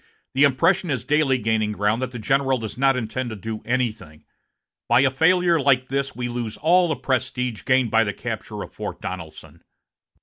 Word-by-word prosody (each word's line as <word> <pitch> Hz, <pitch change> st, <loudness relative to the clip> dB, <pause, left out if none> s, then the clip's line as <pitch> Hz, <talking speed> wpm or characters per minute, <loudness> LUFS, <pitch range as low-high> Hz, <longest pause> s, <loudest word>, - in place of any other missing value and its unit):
The 140 Hz, +2 st, +5 dB
impression 165 Hz, +7 st, +2 dB
is 130 Hz, -4 st, -1 dB
daily 145 Hz, -2 st, +2 dB
gaining 110 Hz, -2 st, 0 dB
ground 105 Hz, +3 st, 0 dB
that 130 Hz, -, -2 dB
the 125 Hz, -, -8 dB
general 135 Hz, +4 st, +1 dB
does 110 Hz, -3 st, -6 dB
not 135 Hz, +1 st, +3 dB
intend 125 Hz, +2 st, -3 dB
to 110 Hz, -, -6 dB
do 110 Hz, +2 st, -6 dB
anything. 110 Hz, -11 st, -3 dB, 0.7 s
By 120 Hz, +2 st, +5 dB
a 135 Hz, -1 st, +3 dB
failure 170 Hz, +4 st, +3 dB
like 130 Hz, -2 st, +2 dB
this 140 Hz, +1 st, -2 dB
we 120 Hz, -1 st, -3 dB
lose 120 Hz, -2 st, -4 dB
all 175 Hz, +3 st, +3 dB
the 155 Hz, -, -1 dB
prestige 125 Hz, -4 st, -2 dB
gained 130 Hz, -4 st, +2 dB
by 115 Hz, 0 st, +4 dB
the 105 Hz, -, -2 dB
capture -, -, -5 dB
of -, -, -12 dB
Fort -, -, -6 dB
Donelson." 80 Hz, -3 st, -8 dB
130 Hz, 190 wpm, -23 LUFS, 110-140 Hz, 0.7 s, The